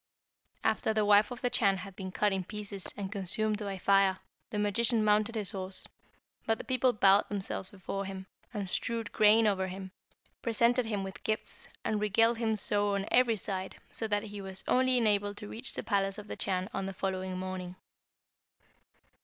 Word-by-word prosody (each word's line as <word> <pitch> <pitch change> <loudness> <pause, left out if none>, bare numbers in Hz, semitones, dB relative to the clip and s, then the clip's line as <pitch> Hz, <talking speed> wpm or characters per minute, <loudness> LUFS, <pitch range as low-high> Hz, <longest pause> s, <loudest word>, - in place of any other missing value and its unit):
"After 220 0 +1
the 215 -1 +2
wife 205 0 +6
of 245 -2 -7
the 245 - 0
Chan 195 -3 +3
had 185 +1 -9
been 190 -1 -6
cut 205 +1 +1
in 190 -1 -1
pieces, 205 0 -4
and 200 -1 -4
consumed 210 +2 +1
by 200 -2 -4
fire, 195 0 +3 0.3
the 210 - -4
magician 215 +2 +2
mounted 210 +2 +3
his 210 -4 +1
horse; 190 -1 -4 0.6
but 225 0 +2
the - - -7
people 255 -1 +2
bowed 200 -2 +4
themselves 195 -2 -3
before 195 0 -5
him, 190 0 -6 0.3
and 205 -2 -4
strewed 230 +3 -2
grain 215 +1 +5
over 190 -3 +1
him, 190 0 -7 0.5
presented 235 +1 +2
him 205 -3 -2
with 190 0 -8
gifts, 215 0 -3 0.2
and 215 -1 0
regaled 225 +3 +3
him 220 -2 +1
so 205 0 +2
on 195 0 -1
every 240 -3 +4
side, 190 -1 -3 0.2
that 210 -2 0
he 205 -2 -7
was 190 -1 -5
only 255 0 +3
enabled 205 -3 +1
to 210 - -7
reach 235 +5 -4
the - - -3
palace 195 -2 0
of 210 - -8
the - - -5
Chan 185 -1 -1
on 195 0 -2
the 195 - -4
following 185 -1 -3
morning. 185 -1 -5
205 Hz, 185 wpm, -31 LUFS, 195-220 Hz, 0.6 s, wife